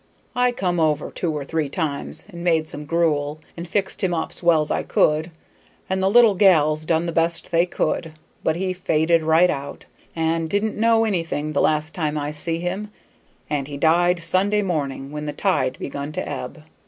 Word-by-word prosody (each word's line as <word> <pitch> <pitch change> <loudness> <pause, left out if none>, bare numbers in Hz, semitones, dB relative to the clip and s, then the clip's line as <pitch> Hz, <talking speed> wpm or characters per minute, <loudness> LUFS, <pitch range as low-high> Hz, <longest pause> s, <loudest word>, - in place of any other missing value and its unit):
I 250 0 +3
come 180 -7 -1
over 155 -2 +1
two 170 - -2
or 150 -2 -3
three 155 -1 -1
times 145 -2 -2
and 170 -3 -8
made 165 -3 +2
some 150 -1 -7
gruel 155 -2 0 0.2
and 170 +1 -7
fixed 200 +3 -2
him 180 -2 +1
up's 160 - -4
well's 165 -3 +3
I - - +1
could, 155 +2 +1 0.6
and 190 0 -1
the 190 - +3
little 230 0 +6
gals 155 -5 +4
done 165 +1 +1
the 170 - -2
best 165 +1 0
they 170 +1 +3
could, 160 -1 -2 0.3
but - - +1
he 185 +1 -1
faded 165 -2 +2
right 160 +3 +4
out, 140 +1 -6 0.3
and 165 0 0
didn't 205 +3 0
know 225 0 +3
anything 165 -6 -2
the 140 - +2
last 155 0 +1
time 155 -2 -2
I 145 0 -2
see 165 +2 -2
him, 185 +5 -4 0.6
and 145 -2 -2
he 145 -1 -6
died 170 +3 +3
Sunday 200 +4 +2
mornin', 140 -6 -3
when 150 0 -5
the 150 - -3
tide 145 -7 0
begun 140 +1 -5
to - - -3
ebb. 145 +2 -6
165 Hz, 190 wpm, -22 LUFS, 150-180 Hz, 0.6 s, little